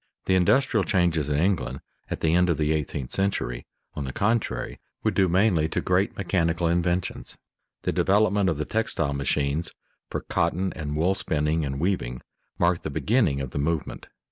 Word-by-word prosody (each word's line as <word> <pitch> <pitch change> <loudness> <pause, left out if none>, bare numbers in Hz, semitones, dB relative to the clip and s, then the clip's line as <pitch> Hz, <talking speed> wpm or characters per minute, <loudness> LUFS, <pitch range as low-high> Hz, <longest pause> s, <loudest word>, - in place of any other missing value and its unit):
The 95 - +2
industrial 110 +4 +3
changes 85 -7 +1
in 75 - +1
England 90 +2 0 0.3
at - - -4
the 80 0 +2
end 90 +1 +4
of 85 - +2
the 75 0 +1
eighteenth 70 -4 -2
century 95 -11 -1 0.3
on 75 - -4
the 65 - -4
contrary 110 - -1 0.2
were - - +2
due 95 -1 +3
mainly 90 -4 +3
to - - -1
great 90 +2 +1
mechanical 85 -3 0
inventions. 85 +1 -1 0.5
The - - +1
development 100 -1 +3
of 80 - -1
the 75 - -2
textile 85 -10 -1
machines 70 +3 0 0.4
for - - -3
cotton 95 +2 0
and 75 -2 -4
wool 85 +5 +2
spinning 80 -3 0
and 70 -1 -3
weaving 75 -9 -1 0.3
mark 85 0 +2
the - - -4
beginning 90 - +1
of 65 -2 -5
the 70 - -3
movement. 80 +1 -2
85 Hz, 170 wpm, -25 LUFS, 75-95 Hz, 0.5 s, end